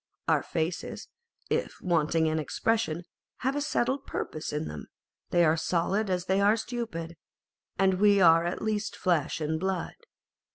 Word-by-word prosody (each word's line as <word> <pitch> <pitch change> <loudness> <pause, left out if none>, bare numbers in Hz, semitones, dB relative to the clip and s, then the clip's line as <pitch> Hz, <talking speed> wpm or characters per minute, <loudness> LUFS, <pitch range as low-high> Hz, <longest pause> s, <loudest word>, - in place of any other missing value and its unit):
Our - - +3
faces, 165 +1 -3 0.4
if - - -1
wanting 165 -2 +1
in 160 0 +1
expression, 175 +2 0 0.4
have 265 +2 0
a 290 - 0
settled 270 -1 0
purpose 155 - -4
in 150 +1 -2
them; 75 - -7 0.4
are 170 -3 +4
as 160 - -2
solid 190 +5 0
as 180 -1 -1
they 190 +1 +2
are 205 +3 +4
stupid; 215 -9 -5 0.6
and 190 -1 +3
we 205 -1 +5
are 165 -2 +6
at 175 +1 -3
least 215 -1 -1
flesh 170 -6 0
and 160 0 -1
blood. 190 -1 -2
180 Hz, 155 wpm, -28 LUFS, 160-210 Hz, 0.6 s, are